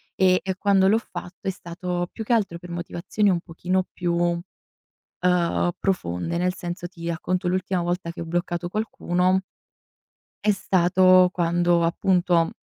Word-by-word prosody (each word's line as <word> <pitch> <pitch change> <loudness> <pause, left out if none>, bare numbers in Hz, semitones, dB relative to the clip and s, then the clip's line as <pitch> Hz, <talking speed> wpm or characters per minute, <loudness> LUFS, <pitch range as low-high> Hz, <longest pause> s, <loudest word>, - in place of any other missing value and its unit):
e 185 -1 +4
e 190 -1 -2
quando 195 -2 +3
l'ho 220 - +4
fatto 180 -5 -9
è 190 - +2
stato 175 0 -4
più 220 - -6
che 240 - -3
altro 195 -7 0
per 180 - -11
motivazioni 175 +4 -1
un 175 -3 +1
pochino 180 +2 -1
più, 175 -1 -1 0.9
uhm, 175 -1 0
profonde, 170 - -1
nel 180 0 0
senso, 175 -1 -5
ti 170 -2 -10
racconto 180 +2 -2
l'ultima 185 0 0
volta 175 0 -2
che 170 - -9
ho 165 - -7
bloccato 175 0 -2
qualcuno 185 -3 0 1.0
è 210 - +4
stato 185 -1 +4
quando 175 0 +2
appunto 175 0 +2
180 Hz, 145 wpm, -24 LUFS, 175-185 Hz, 1.0 s, e